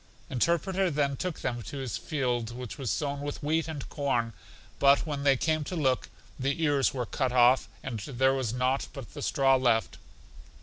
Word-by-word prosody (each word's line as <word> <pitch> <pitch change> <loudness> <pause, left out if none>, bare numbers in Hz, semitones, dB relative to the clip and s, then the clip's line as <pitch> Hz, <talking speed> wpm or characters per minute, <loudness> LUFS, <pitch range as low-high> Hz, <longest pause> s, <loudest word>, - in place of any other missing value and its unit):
Interpreter 175 - +1
then 140 -3 0
took 180 +4 -4
them 120 -1 -2
to 140 - -7
his 130 -3 -3
field, 125 -6 -1
which 125 +1 -7
was 130 -4 -2
sown 140 +7 -1
with 145 +1 -5
wheat 160 +2 +1
and 155 -4 -5
corn; 120 -6 -1 0.5
but 140 +2 +5
when 145 -3 -3
they 140 -2 +4
came 155 +2 +1
to 180 - -4
look, 135 -6 +1 0.3
the 140 +5 -1
ears 145 -3 +3
were 125 -3 -3
cut 130 +2 -1
off, 125 +1 +5
and 120 -4 -4
there 130 +3 +1
was 130 -5 -1
nought 125 +2 0
but 135 -5 -9
the - - -7
straw 135 -2 +3
left. 120 -4 +1
135 Hz, 185 wpm, -29 LUFS, 125-145 Hz, 0.5 s, but